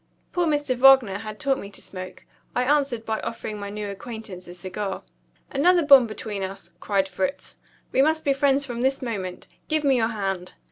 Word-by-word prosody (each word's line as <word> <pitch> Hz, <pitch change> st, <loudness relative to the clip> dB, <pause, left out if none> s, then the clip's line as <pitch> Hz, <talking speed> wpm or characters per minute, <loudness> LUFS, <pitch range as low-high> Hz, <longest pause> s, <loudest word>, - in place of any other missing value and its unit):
Poor 355 Hz, -2 st, +1 dB
Mr. 290 Hz, -4 st, +1 dB
Wagner 255 Hz, -7 st, +6 dB
had 215 Hz, 0 st, -7 dB
taught 275 Hz, -2 st, +1 dB
me 200 Hz, -, -8 dB
to 200 Hz, -, -9 dB
smoke. 185 Hz, -1 st, -9 dB, 0.3 s
I 250 Hz, -, +2 dB
answered 275 Hz, -4 st, +1 dB
by 220 Hz, -1 st, -1 dB
offering 220 Hz, -2 st, -5 dB
my 200 Hz, 0 st, -5 dB
new 210 Hz, 0 st, -5 dB
acquaintance 200 Hz, -3 st, -8 dB
a 175 Hz, -, -9 dB
cigar. 190 Hz, +2 st, -5 dB, 0.5 s
"Another 340 Hz, +4 st, +4 dB
bond 275 Hz, -4 st, +8 dB
between 215 Hz, -2 st, -5 dB
us," 190 Hz, -3 st, -6 dB
cried 195 Hz, -2 st, +1 dB
Fritz. 275 Hz, +10 st, -3 dB, 0.3 s
"We 265 Hz, -, +3 dB
must 315 Hz, +2 st, +2 dB
be 280 Hz, -, +4 dB
friends 275 Hz, 0 st, +2 dB
from 240 Hz, -2 st, -5 dB
this 270 Hz, +1 st, +1 dB
moment. 195 Hz, -7 st, -4 dB, 0.2 s
Give 310 Hz, -1 st, +1 dB
me 275 Hz, -3 st, +4 dB
your 225 Hz, -2 st, +2 dB
hand." 195 Hz, -5 st, -3 dB
230 Hz, 190 wpm, -24 LUFS, 200-275 Hz, 0.5 s, bond